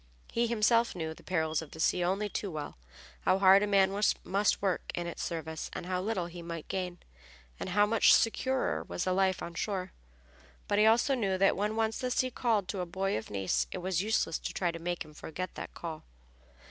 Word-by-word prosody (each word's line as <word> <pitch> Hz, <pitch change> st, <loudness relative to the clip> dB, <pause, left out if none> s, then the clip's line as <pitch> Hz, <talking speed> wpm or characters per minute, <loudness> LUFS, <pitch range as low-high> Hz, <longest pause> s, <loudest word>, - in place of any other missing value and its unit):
He 235 Hz, 0 st, +1 dB
himself 230 Hz, 0 st, +3 dB
knew 160 Hz, -2 st, -3 dB
the -, -, -16 dB
perils 160 Hz, -3 st, 0 dB
of 160 Hz, -, -9 dB
the 160 Hz, -, -12 dB
sea 175 Hz, +2 st, +2 dB
only 195 Hz, +4 st, 0 dB
too 205 Hz, 0 st, -3 dB
well, 150 Hz, -4 st, -6 dB, 0.5 s
how 185 Hz, -, +3 dB
hard 195 Hz, 0 st, +7 dB
a 210 Hz, -, +1 dB
man 195 Hz, -1 st, +4 dB, 0.3 s
must 200 Hz, +2 st, +1 dB
work 195 Hz, -3 st, -1 dB
in 175 Hz, -, -3 dB
its 170 Hz, -, -5 dB
service, 160 Hz, -2 st, -4 dB
and -, -, -5 dB
how 180 Hz, 0 st, -1 dB
little 195 Hz, -3 st, -1 dB
he 175 Hz, 0 st, -8 dB
might 170 Hz, -2 st, -6 dB
gain, 180 Hz, -2 st, -3 dB, 0.6 s
and -, -, -4 dB
how 205 Hz, +3 st, +4 dB
much 220 Hz, +1 st, +5 dB
securer 260 Hz, +3 st, +2 dB
was -, -, -4 dB
the 185 Hz, -, +1 dB
life 190 Hz, 0 st, +1 dB
on 170 Hz, -, -6 dB
shore. 185 Hz, +1 st, -3 dB, 0.8 s
But 205 Hz, 0 st, +2 dB
he 215 Hz, -, +6 dB
also 240 Hz, +5 st, +4 dB
knew 200 Hz, -7 st, 0 dB
that 195 Hz, +1 st, +4 dB
when 210 Hz, +2 st, -1 dB
once 220 Hz, 0 st, 0 dB
the 255 Hz, -, -1 dB
sea 255 Hz, +1 st, +1 dB
called 220 Hz, -6 st, +1 dB
to 195 Hz, -, -3 dB
a 180 Hz, -, -1 dB
boy 190 Hz, +3 st, -1 dB
of 110 Hz, -, -4 dB
Nice 90 Hz, -12 st, 0 dB
it -, -, -4 dB
was 185 Hz, -1 st, -1 dB
useless 210 Hz, -6 st, 0 dB
to -, -, -5 dB
try 175 Hz, -2 st, +1 dB
to 165 Hz, -, -7 dB
make 175 Hz, 0 st, -3 dB
him 150 Hz, -, -14 dB
forget 170 Hz, +4 st, -6 dB
the -, -, -6 dB
call. 160 Hz, -2 st, -6 dB
185 Hz, 220 wpm, -31 LUFS, 170-210 Hz, 0.8 s, hard